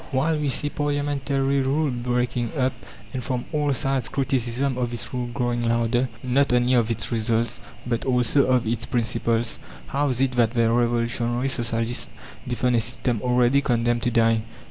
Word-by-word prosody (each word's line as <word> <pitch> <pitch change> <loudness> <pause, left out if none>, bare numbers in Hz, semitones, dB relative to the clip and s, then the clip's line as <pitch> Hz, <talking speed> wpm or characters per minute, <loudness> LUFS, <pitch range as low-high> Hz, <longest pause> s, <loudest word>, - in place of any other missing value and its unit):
While 150 +3 +1
we 145 -1 0
see 145 +2 +1
parliamentary 140 -1 0
rule 140 +2 +1
breaking 125 -1 -1
up, 130 -1 +1 0.4
and 130 -2 -3
from 125 0 -2
all 150 -1 +1
sides 135 -2 0
criticism 130 0 0
of 125 -1 -1
this 120 +1 -4
rule 125 -1 -2
growing 120 -1 -1
louder 120 +2 +1
not 135 +2 +2
only 125 +1 +3
of 120 -3 +3
its 115 +1 -2
results, 115 0 0 0.2
but 120 -1 -1
also 130 +2 +2
of 125 -2 +2
its 110 -1 -2
principles 115 -1 0 0.3
how 145 +1 0
is 125 -2 -1
it 135 -1 +2
that 120 -1 +1
the 115 -1 +3
revolutionary 120 +1 0
socialists 120 -1 -2 0.4
defend 125 0 +1
a - - +3
system 120 -1 -1
already 125 +2 +3
condemned 120 -2 +1
to 120 - +1
die? 115 -1 +3
125 Hz, 165 wpm, -24 LUFS, 120-135 Hz, 0.4 s, only